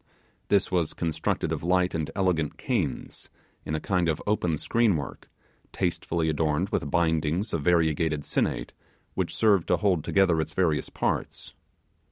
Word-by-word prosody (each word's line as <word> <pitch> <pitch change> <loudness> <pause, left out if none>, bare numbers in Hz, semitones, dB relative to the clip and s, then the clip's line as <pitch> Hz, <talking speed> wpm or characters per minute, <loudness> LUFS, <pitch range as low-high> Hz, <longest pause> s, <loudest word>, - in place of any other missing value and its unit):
This 100 -2 +2
was 85 -4 0
constructed 80 -3 -1
of - - -2
light 90 +1 +2
and 80 -1 -2
elegant 90 -6 0
canes 95 - -3 0.4
in 75 - -2
a - - -1
kind 90 0 0
of 80 - 0
open 90 -6 +1
screenwork, 80 - 0 0.5
tastefully 85 -2 -1
adorned 80 +4 0
with 70 - -1
bindings 80 +5 +1
of 85 - 0
variegated 80 -2 +2
sinnate, - - -1 0.4
which - - -2
served 100 -6 +3
to - - +3
hold 95 -7 +1
together 90 -5 +3
its - - -5
various 80 -5 +1
parts. - - -3
85 Hz, 145 wpm, -27 LUFS, 80-95 Hz, 0.5 s, served